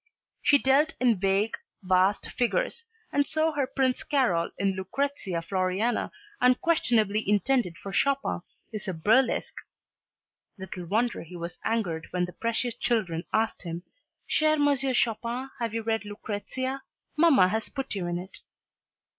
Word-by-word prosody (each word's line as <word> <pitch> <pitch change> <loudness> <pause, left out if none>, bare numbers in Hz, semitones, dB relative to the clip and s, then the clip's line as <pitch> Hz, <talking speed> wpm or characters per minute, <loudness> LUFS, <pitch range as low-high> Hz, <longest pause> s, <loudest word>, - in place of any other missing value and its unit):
She 285 - +6
dealt 280 +4 +3
in 240 -6 +3
vague, 195 +3 +1 0.3
vast 185 +2 +2
figures, 465 - -1 0.3
and 285 0 +2
so 315 +1 +1
her 285 -3 -1
Prince 260 -1 0
Karol 235 - +1
in 195 0 +1
"Lucrezia 190 -3 -2
Floriana," 185 +6 0 0.3
unquestionably 240 - +3
intended 210 -3 +2
for 195 - -8
Chopin, 275 +5 +1 0.3
is 210 -1 -5
a 185 - -2
burlesque 220 +11 +2 1.0
little 185 -2 -7
wonder 235 +6 0
he 175 +2 -11
was 170 0 -6
angered 185 -8 -1
when 180 -1 0
the 180 - -10
precious 230 +1 -1
children 190 -11 -1
asked 220 0 0
him 170 -1 -6 0.4
"Cher 310 0 +3
M. 290 -1 +3 0.2
Chopin, 240 +3 -1
have 230 -2 -1
you 225 0 -3
read 225 -1 0
'Lucrezia'? 225 +6 -4 0.3
Mamma 300 - +5
has 220 +3 -2
put 270 0 -4
you 190 -4 -3
in 175 0 -1
it." 185 +2 -8
225 Hz, 140 wpm, -27 LUFS, 185-265 Hz, 1.0 s, She